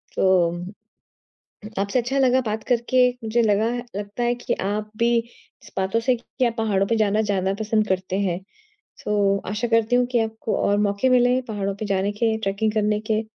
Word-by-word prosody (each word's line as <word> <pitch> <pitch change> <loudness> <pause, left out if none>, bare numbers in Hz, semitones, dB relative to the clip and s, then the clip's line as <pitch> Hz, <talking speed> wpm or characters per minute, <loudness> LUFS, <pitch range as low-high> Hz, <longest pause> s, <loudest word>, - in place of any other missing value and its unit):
तो 185 -3 +3
उ 175 +1 -6 1.1
आपसे 200 +5 +1
अच्छा 255 +4 -2
लगा 260 -1 +4
बात 220 -2 -3
करके। 250 +1 +3 0.2
मुझे 225 +2 +1
लगा 215 0 +2 0.3
लगता 205 +3 -4
है 240 0 +2
कि 245 - -3
आप 210 +2 -2
भी 235 - +2 0.6
इस - - -15
बातों 190 +4 +1
से 255 +1 +2
कि 250 +2 -3
आप 230 -1 0
पहाड़ों 205 -3 +1
पे 230 - +1
जाना 215 0 +2
ज़्यादा 195 -2 0
पसंद 215 0 +1
करते 185 0 -1
हैं। 180 -2 -1 0.6
सो 200 -1 +2
आशा 220 +4 -2
करती 230 +2 +2
हूँ 250 0 +3
कि 240 - +2
आपको 220 0 -3
और 205 0 +2
मौके 200 +6 +1
मिले 250 0 +4
पहाड़ों 200 -2 -2
पे 215 - -5
जाने 195 0 0
के, 220 +1 0
ट्रैकिंग 215 +1 -1
करने 210 -1 +1
के। 215 +1 +2
215 Hz, 190 wpm, -23 LUFS, 200-235 Hz, 1.1 s, लगा